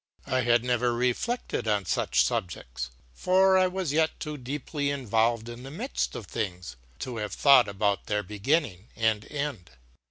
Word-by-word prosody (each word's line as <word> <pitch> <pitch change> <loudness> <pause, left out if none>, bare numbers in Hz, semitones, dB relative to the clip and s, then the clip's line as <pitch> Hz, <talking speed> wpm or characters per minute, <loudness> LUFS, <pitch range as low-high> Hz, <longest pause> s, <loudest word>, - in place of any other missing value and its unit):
I 130 +1 +1
had 120 -1 +3
never 125 -1 +1
reflected 125 - -1
on 105 -3 +1
such - - +2
subjects, - - -3 0.2
for 190 - +4
I 185 0 +5
was 180 -5 -2
yet 160 +1 +1
too 150 -1 -4
deeply 145 +2 -3
involved 115 -4 +1
in 120 +1 -8
the 135 - -8
midst 220 - -3
of 110 - -6
things 90 - -4 0.3
to 125 -3 -4
have 105 -2 -4
thought 135 -5 +6
about 100 0 -1
their 105 0 0
beginning 105 - -1
and 110 -2 0
end. 145 - -4
120 Hz, 160 wpm, -27 LUFS, 105-145 Hz, 0.3 s, thought